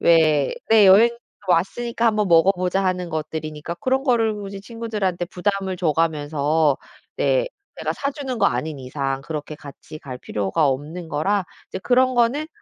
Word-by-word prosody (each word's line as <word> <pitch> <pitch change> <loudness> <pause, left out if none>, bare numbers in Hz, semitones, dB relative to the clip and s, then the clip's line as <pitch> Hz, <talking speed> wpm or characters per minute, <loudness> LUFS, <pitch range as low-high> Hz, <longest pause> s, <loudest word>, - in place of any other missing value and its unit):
왜 155 -4 +4 0.2
네 215 -3 +7
'여행 215 +5 +7 0.4
왔으니까 230 +7 +1
1 225 - +3
번 210 -2 +1
먹어보자.' 180 +2 +3
하는 180 -1 -1
것들이니까 155 +1 -4
그런 265 +1 0
거를 230 -5 +2
굳이 200 -1 -7
친구들한테 210 -5 -3
부담을 190 +1 -2
줘가면서 155 -2 +1 0.4
네. - - +1 0.3
내가 - - -1
사주는 275 -3 -4
거 - - +4
아닌 140 +5 -2
이상 135 +1 -3
그렇게 150 0 -5
같이 145 +2 -11
갈 130 -4 -8
필요가 105 +8 0
없는 155 +6 -4
거라 190 +6 0 0.2
이제 - - -5
그런 255 +3 +3
거는 245 +6 +2
180 Hz, 325 characters per minute, -22 LUFS, 155-220 Hz, 0.4 s, 네